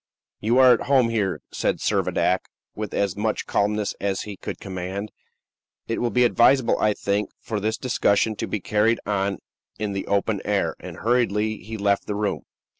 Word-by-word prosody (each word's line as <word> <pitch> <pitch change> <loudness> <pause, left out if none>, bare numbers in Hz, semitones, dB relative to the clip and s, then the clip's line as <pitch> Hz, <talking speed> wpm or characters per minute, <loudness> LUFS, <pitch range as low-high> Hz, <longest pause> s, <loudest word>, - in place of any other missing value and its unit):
"You 115 +4 +1
are 130 -1 +8
at 120 - -2
home 130 -4 +4
here," 105 -4 -1
said - - 0
Servadac, 95 0 +1 0.3
with 105 -2 -5
as 100 -3 0
much 105 +1 -1
calmness 105 0 0
as 100 -1 -1
he 105 -2 -7
could - - -6
command; 95 +2 -5 0.8
"it 115 - -2
will 120 - +1
be 125 +1 +3
advisable, 120 +1 +4
I 105 - +3
think, 100 0 -1
for 110 -2 -3
this 110 +2 -1
discussion 110 -4 +1
to - - -3
be 105 - -3
carried 105 +5 +2
on 100 -2 0 0.4
in 105 -1 -2
the 100 - -4
open 100 0 0
air." 100 -5 0
And 90 -2 -9
hurriedly 110 -2 +1
he 110 +1 -7
left 100 -1 +1
the 105 - -2
room. 105 -1 -2
105 Hz, 180 wpm, -24 LUFS, 100-115 Hz, 0.8 s, are